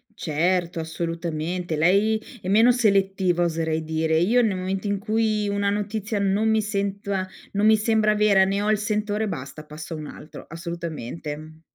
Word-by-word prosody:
Certo, 170 +2 0
assolutamente. 165 +1 -3
Lei 200 +7 +3 0.2
è 185 - -7
meno 225 +5 +6
selettiva 195 -6 +2
oserei 160 -1 -1
dire. 160 0 0
Io 215 +9 +4
nel 210 -5 +1
momento 190 +2 -3
in 200 -1 0
cui, 215 0 0
una 200 0 0
notizia 210 +1 -2
non 200 +2 +2
mi 220 0 +3
sento 200 -1 -3
a 185 -1 -1 0.3
non 205 +1 +1
mi 220 0 +6
sembra 215 0 +2
vera, 210 -2 +5
ne 195 +1 0
ho 210 - 0
il 215 - +3
sentore, 210 0 -1
basta, 155 -3 -6
passo 150 +2 -8
a - - -4
un 155 -1 -7
altro, 150 - -11
assolutamente, 165 -4 -5
uhm 155 +1 -11
195 Hz, 175 wpm, -24 LUFS, 165-210 Hz, 0.3 s, meno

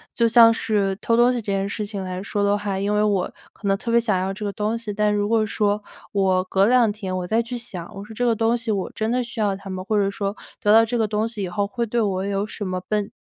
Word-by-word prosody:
就 235 -1 +3
像 230 0 +7
是 200 -4 0
偷 230 +1 +1
东 240 +1 +5
西 245 - -1
这 - - -20
件 195 0 0
事 210 +1 -3
情 200 -2 -5
来 185 +1 -5
说 205 0 -2
的 200 0 +3
话， 200 -2 -3
因 205 +1 0
为 210 - +3
我 200 -4 +1 0.2
可 200 - -7
能 195 0 +2
特 230 +2 -4
别 235 - +5
想 215 -5 +1
要 190 +1 -2
这 210 - -7
个 200 - -1
东 215 +1 -1
西， 225 -2 -5
但 210 0 +1
如 205 0 0
果 225 -1 +3
说 210 -1 0 0.3
我 190 -2 +2
隔 195 +1 +2
2 240 -3 +4
天 195 -3 -5
我 180 -1 -3
再 225 +3 +2
去 245 +2 -6
想， 190 -5 -7
我 195 - -7
说 220 - -11
这 245 - 0
个 230 -2 +3
东 225 +2 +2
西 230 -1 -3
我 195 -2 -2
真 220 +1 -1
的 250 +1 +1
需 240 -1 -8
要 200 -2 +1
它 195 0 -10
吗？ 185 0 -4
或 210 +2 0
者 200 -1 +2
说 200 0 -3 0.3
得 210 +1 +4
到 225 0 +8
这 240 +2 -2
个 220 - +2
东 215 +2 0
西 215 -4 -5
以 180 - -3
后 200 +3 -1
会 235 +2 -2
对 235 +1 0
我 190 -2 0
有 200 0 -1
什 205 - -5
么 185 -1 -3
本 210 0 -1
210 Hz, 315 characters per minute, -23 LUFS, 195-225 Hz, 0.3 s, 到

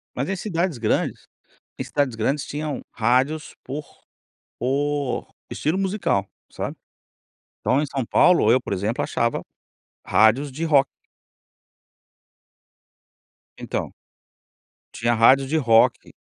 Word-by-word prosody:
Mas 135 +8 -2
em 195 - 0
cidades 175 - -2
grandes, 110 -2 -1 0.5
em - - -3
cidades 140 -5 -1
grandes 140 +6 -1
tinham 150 0 -4
rádios 130 +7 +1
por 145 +3 -5 0.7
por 140 +2 -1 0.2
estilo 160 +5 -1
musical, 190 - 0 0.2
sabe. - - -5 0.9
Então 135 +3 +2
em - - 0
São 135 -3 -3
Paulo, 170 -9 +4
eu 130 - +5
por 100 - -4
exemplo, 105 +5 -1
achava 115 0 -1 0.6
rádios 120 +7 +3
de 155 +5 -5
rock. 140 -4 +4 2.7
Então. - - -4 1.0
Tinha 120 0 0
rádios 130 +4 +5
de 160 - +1
rock, 115 -5 +5
de - - -16
135 Hz, 115 wpm, -23 LUFS, 120-150 Hz, 2.7 s, eu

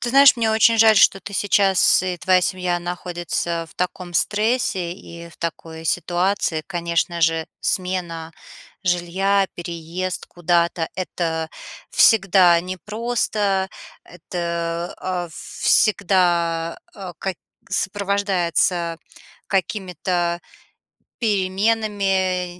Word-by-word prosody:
Ты 240 - -2
знаешь, 275 0 +7
мне 225 -2 +1
очень 225 +1 +4
жаль, 220 -1 +6
что 195 - +5
ты 200 - -9
сейчас 195 -2 +3
и 180 -1 -2
твоя 185 +1 +3
семья 180 -1 -1
находится 175 -1 -3
в - - -19
таком 180 -1 -4
стрессе 210 -4 +1
и 170 -2 -11
в 170 - -18
такой 165 -1 -6
ситуации. 175 0 0
Конечно 170 -1 -1
же, 165 0 +2
смена 175 -3 -2 0.5
жилья, 190 +3 +1
переезд 175 +1 -5
куда-то- 170 -1 0
это 165 -3 -3 0.4
всегда 190 -5 +5
непросто, 200 +1 -1 0.4
это, 170 0 -4
а, 180 -2 -3
всегда, 170 -3 +1 0.2
э, 190 -3 -7
ка 190 -1 -3 0.3
сопровождается 190 -3 0 0.5
какими-то 180 -3 -1 0.8
переменами, 195 -3 0
180 Hz, 95 wpm, -21 LUFS, 170-195 Hz, 0.8 s, знаешь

